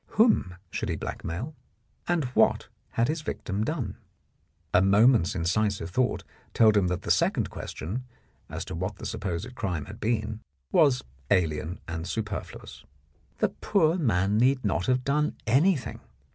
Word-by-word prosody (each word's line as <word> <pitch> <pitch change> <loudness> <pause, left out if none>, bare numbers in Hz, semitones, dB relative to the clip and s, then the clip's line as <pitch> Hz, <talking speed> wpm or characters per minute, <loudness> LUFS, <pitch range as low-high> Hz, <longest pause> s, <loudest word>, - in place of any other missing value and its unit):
Whom 215 - +4 0.2
should - - -3
he - - 0
blackmail, 110 - -5 0.5
and 175 -3 +2
what - - +3 0.2
had 115 +1 +2
his 155 +2 -1
victim 105 -8 -3
done? 150 0 -3 0.8
A 90 - +6
moment's 105 0 +4
incisive 90 +1 0
thought 125 +6 +1 0.3
told 110 -2 +6
him 100 -3 +3
that 90 0 -2
the - - 0
second - - +2
question, 115 +11 -5 0.4
as - - -5
to - - -6
what 95 +5 -3
the - - -9
supposed 105 +1 -4
crime 90 - -3
had 105 +2 -10
been, 110 -1 -1 0.3
was 140 -5 +4 0.3
alien 85 -2 +1
and 85 0 -4
superfluous. 105 0 -5 0.5
The - - +2
poor 175 -6 +2
man 105 - +2
need 130 0 +3
not 95 -2 0
have 125 0 +2
done 150 +3 +1
anything. 145 - +2
110 Hz, 145 wpm, -27 LUFS, 90-130 Hz, 0.8 s, A